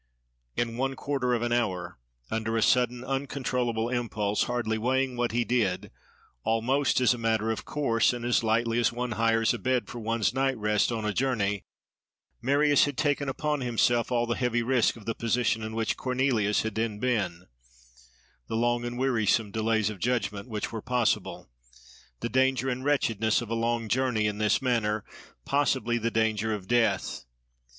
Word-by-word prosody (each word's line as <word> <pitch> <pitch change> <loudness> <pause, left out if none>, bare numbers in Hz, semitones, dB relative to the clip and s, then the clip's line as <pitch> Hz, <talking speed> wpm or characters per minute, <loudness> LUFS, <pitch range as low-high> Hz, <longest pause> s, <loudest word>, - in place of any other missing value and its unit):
In 115 -1 -1
one 135 +1 -1
quarter 130 -2 -1
of 120 - -2
an 120 - -1
hour, 100 - -1 0.3
under 110 0 -1
a 110 - +2
sudden, 125 -1 +2
uncontrollable 125 -4 -1
impulse, 110 -4 -1
hardly 115 -3 -1
weighing 130 +2 0
what 120 0 0
he 120 +1 0
did, 110 -7 0 0.5
almost 130 +6 +1
as 125 -2 +4
a 120 - -6
matter 110 -1 +1
of 110 - -4
course 115 -7 +2
and 120 -1 -5
as 120 0 +2
lightly 115 +1 +1
as 120 - +2
one 120 +1 -3
hires 115 0 +2
a - - -4
bed 130 -1 0
for 120 - -7
one's 115 0 0
night's 135 -1 +1
rest 105 +1 +1
on 110 -2 -2
a 105 - 0
journey, 105 -6 0 0.8
Marius 145 +3 +4
had 145 -2 -4
taken 145 -2 0
upon 150 +1 -1
himself 120 0 +1
all 120 -1 +2
the 120 - -1
heavy 120 -1 0
risk 125 -1 +2
of 110 -3 -13
the 115 - -1
position 115 -1 0
in 110 0 -5
which 115 -1 -1
Cornelius 125 -5 +1
had 110 -1 -3
then 110 -1 -2
been—the 100 -7 -1 1.1
long 120 +1 +1
and 120 0 -4
wearisome 115 -4 +1
delays 110 0 +1
of 100 - -9
judgment, 105 -1 -1
which 105 -2 -3
were 110 - -5
possible; 125 -3 -1 0.7
the - - -1
danger 130 +1 +2
and 130 0 -3
wretchedness 115 -7 +1
of 115 -2 -6
a - - +1
long 115 0 0
journey 125 -2 +1
in 105 0 -1
this 110 +4 +2
manner; 110 -4 0 0.4
possibly 130 -4 +1
the 115 +1 0
danger 110 -1 0
of 95 -3 -9
death. 120 - +1
120 Hz, 175 wpm, -27 LUFS, 110-125 Hz, 1.1 s, as